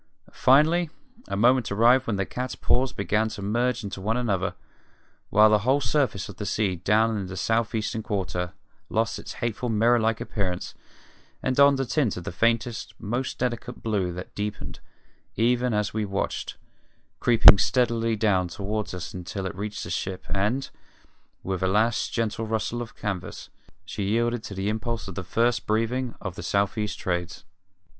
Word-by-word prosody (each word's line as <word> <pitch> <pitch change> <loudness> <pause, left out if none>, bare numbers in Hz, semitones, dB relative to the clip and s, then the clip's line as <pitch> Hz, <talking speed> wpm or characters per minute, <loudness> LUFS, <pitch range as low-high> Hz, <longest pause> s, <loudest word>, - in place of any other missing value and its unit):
Finally 155 +6 +4 0.4
a 100 - -3
moment 120 +2 +3
arrived 120 +5 +4
when 110 - 0
the 100 0 -1
cats 125 +5 -4
paws 130 +1 +1
began 105 +2 0
to 110 - -8
merge 120 +5 0
one 105 +3 -2
into - - 0
another, 95 -2 0 0.7
while 105 +1 +6
the 105 - +5
whole 130 +7 +2
surface 125 -5 0
of 100 - -10
the 105 - -4
sea 100 -2 0
down 110 +5 +2
in 100 -3 -3
the 95 +1 -7
south 115 +4 0
eastern 110 +1 -2
quarter 95 -4 -3 0.4
lost 115 +1 0
its - - -8
hateful 120 +1 -2
mirror 115 +2 +4
like 110 0 +1
appearance 95 -5 -3 0.7
and 130 - 0
donned 140 0 +6
a 135 - 0
tint 125 -7 0
of 90 - -7
faintest, 115 +2 0
most 120 +5 -3
delicate 125 0 -3
blue 100 -5 0
that 90 +2 -8
deepened, 105 0 -5 0.6
even 125 +2 +2
as 105 -2 0
we 110 0 -1
watched, 100 -1 -3 0.6
creeping 110 -4 +8
steadily 115 0 +2
down 100 -4 +2
toward 100 +2 -4
us 90 -3 -6
until 90 +2 -5
it 95 - -3
reached 105 +2 -5
the - - -6
ship 95 -1 -3
and, 110 +8 0 0.7
with 95 -1 -3
a 95 - +2
last 110 +4 +1
gentle 115 -1 -1
rustle 110 +2 -2
of 120 - -8
canvas, 100 -5 -5 0.3
she - - -5
yielded 115 +4 +1
to 100 - -8
the 95 +1 -2
impulse 115 +1 -2
of 95 - -6
the 95 - -5
first 115 +6 +1
breathing 115 +3 0
of 95 -4 -5
the - - -8
south 100 0 0
east 105 -1 -2
Trades. 90 -2 -3
110 Hz, 170 wpm, -26 LUFS, 100-120 Hz, 0.7 s, creeping